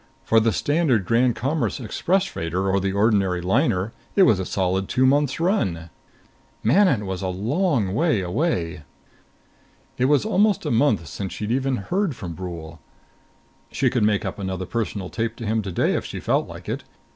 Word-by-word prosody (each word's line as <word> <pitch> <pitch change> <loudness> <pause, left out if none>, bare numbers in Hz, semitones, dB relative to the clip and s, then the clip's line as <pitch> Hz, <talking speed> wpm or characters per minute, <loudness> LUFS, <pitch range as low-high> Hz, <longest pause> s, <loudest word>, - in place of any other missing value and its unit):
For 115 - +4
the 110 0 +2
standard 140 - +1
Grand 120 +2 +2
Commerce 145 +3 -1
express 180 - 0
freighter 90 - -3
or 100 - +2
the 95 0 -1
ordinary 100 -3 +2
liner 100 - +1 0.2
it 195 - +6
was 110 - +4
a 95 - -2
solid 95 0 -1
two 130 - +2
months' 140 +1 +2
run. 95 - 0 0.7
Manon 135 - +3
was 95 -1 -4
a 95 - -2
long 115 - 0
way 155 - +2
away! 90 - -1 1.2
It 125 - +3
was 145 +7 +3
almost 210 -2 +2
a - - -1
month 115 - +2
since 95 +6 -5
she'd 105 +1 -4
even 135 +1 +1
heard 175 - -1
from 90 -6 -6
Brule. 85 -2 -7 0.9
She 130 -2 +1
could 125 - 0
make 105 -1 +2
up - - -4
another 95 -1 -3
personal 100 -3 -3
tape 115 0 -2
to 115 - -7
him 110 +1 0
today 95 -4 0
if - - -1
she - - -6
felt - - 0
like - - -10
it. - - -3
110 Hz, 175 wpm, -23 LUFS, 95-140 Hz, 1.2 s, it